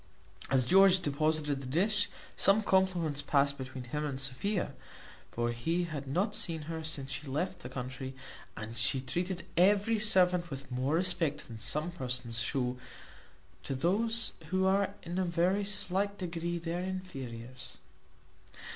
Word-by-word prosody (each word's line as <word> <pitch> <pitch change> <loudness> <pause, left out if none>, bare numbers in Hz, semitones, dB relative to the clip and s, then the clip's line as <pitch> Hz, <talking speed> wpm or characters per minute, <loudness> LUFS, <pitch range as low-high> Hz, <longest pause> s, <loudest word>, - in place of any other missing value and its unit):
As 130 -2 +4
George 190 +4 +6
deposited 150 -1 0
the 130 - -7
dish, 205 +9 +2 0.3
some 200 +3 +4
compliments 180 -7 +2
passed 140 -1 +2
between 130 -2 -7
him 150 +5 -3
and 140 -3 -3
Sophia 175 +10 -2 0.6
(for 120 0 -1
he 165 +10 -1
had 150 -5 -5
not 180 +11 0
seen 160 -3 0
her 160 +1 -5
since 140 -4 -1
she 140 +3 -5
left 155 +7 -2
the 125 - -8
country, 130 +1 -6 0.4
and 110 +1 -6
she 120 +3 +1
treated 175 +8 -2
every 205 +5 +4
servant 180 -4 +5
with 135 -2 -7
more 130 +4 0
respect 170 -4 0
than 115 -2 -9
some 155 +9 0
persons 125 -7 -3
shew 125 +1 -1 0.8
to 135 - -3
those 225 - +1 0.2
who 185 +1 +2
are 195 +1 +2
in 175 +2 -3
a - - +2
very 180 +3 +1
slight 200 0 +1
degree 175 -1 -3
their 170 +1 -3
inferiors). 130 -10 -6
165 Hz, 145 wpm, -31 LUFS, 130-185 Hz, 0.8 s, George